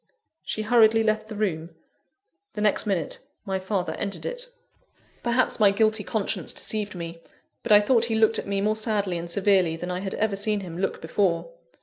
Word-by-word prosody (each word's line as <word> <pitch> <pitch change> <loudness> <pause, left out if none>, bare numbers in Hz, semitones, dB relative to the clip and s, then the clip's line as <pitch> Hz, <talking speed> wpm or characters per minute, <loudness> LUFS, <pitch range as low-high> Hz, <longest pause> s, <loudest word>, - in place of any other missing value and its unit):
She 215 - -3
hurriedly 225 0 +5
left 215 0 0
the 220 - -7
room. 170 -6 -2 0.8
The 210 - -4
next 210 0 +1
minute, 180 -6 -1 0.3
my 190 -1 -2
father 190 -1 -2
entered 200 - -3
it. - - -5 0.7
Perhaps 240 +1 +1
my 210 -2 +6
guilty 215 +1 +1
conscience 215 -1 -2
deceived 210 -3 -1
me, 170 -1 -7 0.4
but 235 - -4
I 205 - +9
thought 230 +2 +3
he 225 -1 -1
looked 220 0 +4
at - - -6
me 200 0 -1
more 215 +1 +1
sadly 205 -5 -1
and 170 +1 -6
severely 185 -2 +2
than 175 +2 -5
I 180 - -2
had 190 0 -4
ever 215 -2 0
seen 205 +1 -1
him 175 -2 -7
look 195 -3 -2
before. 185 - 0
205 Hz, 190 wpm, -25 LUFS, 185-220 Hz, 0.8 s, I